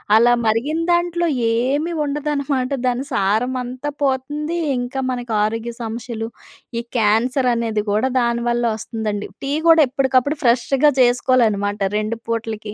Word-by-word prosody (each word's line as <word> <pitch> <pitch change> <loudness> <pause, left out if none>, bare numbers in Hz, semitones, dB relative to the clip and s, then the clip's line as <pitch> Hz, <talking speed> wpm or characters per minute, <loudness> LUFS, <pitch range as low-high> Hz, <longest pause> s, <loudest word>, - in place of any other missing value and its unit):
అలా 235 +2 +6
మరిగిన 235 +9 +1
దాంట్లో 345 0 +1 0.3
ఏమీ 270 +8 0
ఉండదనమాట. 280 -3 -1 0.2
దాని 250 +1 0
సారమంతా 250 +6 -1
పోతుంది. 290 +4 -1 0.2
ఇంకా 245 +2 -3
మనకు 245 -2 -4
ఆరోగ్య 225 +2 -2
సమస్యలు, 225 0 -5 0.5
ఈ - - -2 0.2
క్యాన్సర్ 235 +5 +2
అనేది 225 -2 -1
కూడా 215 +5 +2
దానివల్ల 235 0 0
వస్తుందండి. 215 -2 -4 0.2
టీ 275 - -2 0.2
కూడా 325 -1 +7
ఎప్పటికప్పుడు 265 +2 +1
ఫ్రెష్‌గా 260 +4 +3
చేసుకోలనమాట 215 -5 +2
రెండు 215 +2 -2
పూటలకి. 220 -2 -4
245 Hz, 120 wpm, -20 LUFS, 225-275 Hz, 0.5 s, కూడా